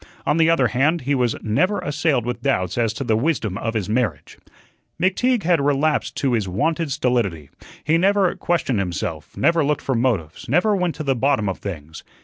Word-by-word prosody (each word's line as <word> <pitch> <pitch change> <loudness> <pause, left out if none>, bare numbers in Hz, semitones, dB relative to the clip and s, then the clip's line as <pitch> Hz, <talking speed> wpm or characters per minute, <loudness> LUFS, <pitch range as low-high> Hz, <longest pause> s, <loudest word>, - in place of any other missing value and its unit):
On 150 - +1
the 165 0 +4
other 135 -7 +3
hand, 150 +7 +1
he 140 +3 -1
was 125 -4 +1
never 180 - +1
assailed 145 -4 0
with 125 0 -4
doubts 95 -11 0
as 115 -2 +1
to 135 - -4
the 115 -4 +1
wisdom 115 - -1
of 115 0 -3
his 105 -4 -1
marriage. 110 - -2 0.6
McTeague 220 +5 +1
had 170 -2 +2
relapsed 145 +2 0
to 135 -3 0
his 110 -4 0
wonted 155 - -1
stolidity. 105 - -1 0.3
He 160 +3 +2
never 195 0 +2
questioned 150 -10 0
himself, 85 -4 -4
never 165 +2 +3
looked 150 +1 -1
for 135 - -1
motives, 115 - -1
never 180 - +3
went 180 -3 -1
to 155 - -5
the 135 -2 +1
bottom 130 -4 +1
of 95 - -3
things. 80 -5 -7
135 Hz, 190 wpm, -21 LUFS, 110-160 Hz, 0.6 s, the